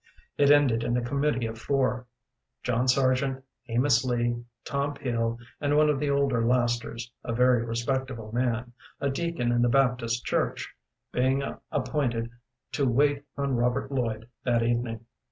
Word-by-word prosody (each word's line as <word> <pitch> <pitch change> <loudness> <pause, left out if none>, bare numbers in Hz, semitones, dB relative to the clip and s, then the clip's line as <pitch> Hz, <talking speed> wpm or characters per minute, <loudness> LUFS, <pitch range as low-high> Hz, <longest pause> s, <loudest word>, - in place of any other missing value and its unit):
It 140 -1 +4
ended 140 -6 +5
in 120 - 0
a 125 - -1
committee 140 -2 0
of 115 0 -5
four 130 -1 0 0.6
John 125 +1 +1
Sargent, 130 0 +2 0.2
Amos 125 +1 +3
Lee, 120 -1 0 0.2
Tom 140 +1 -1
Peel, 115 -4 -1 0.2
and 145 0 +1
one 150 0 +5
of 140 - -1
the 145 - 0
older 140 -4 +2
lasters, 120 -1 0
a 115 - -3
very 125 -1 +4
respectable 120 -1 -3
man, 120 0 -1 0.3
a 140 - 0
deacon 135 -5 -1
in 120 0 +2
the 120 - +3
Baptist 125 -2 +1
Church - - -1 0.4
being 130 +2 +1 0.3
appointed 125 -4 -1 0.4
to 140 -3 +1
wait 140 +3 +2 0.2
on 140 -2 0
Robert 125 +4 0
Lloyd 115 -4 -2 0.2
that 120 -2 +2
evening. 115 -1 -1
125 Hz, 150 wpm, -27 LUFS, 120-135 Hz, 0.6 s, ended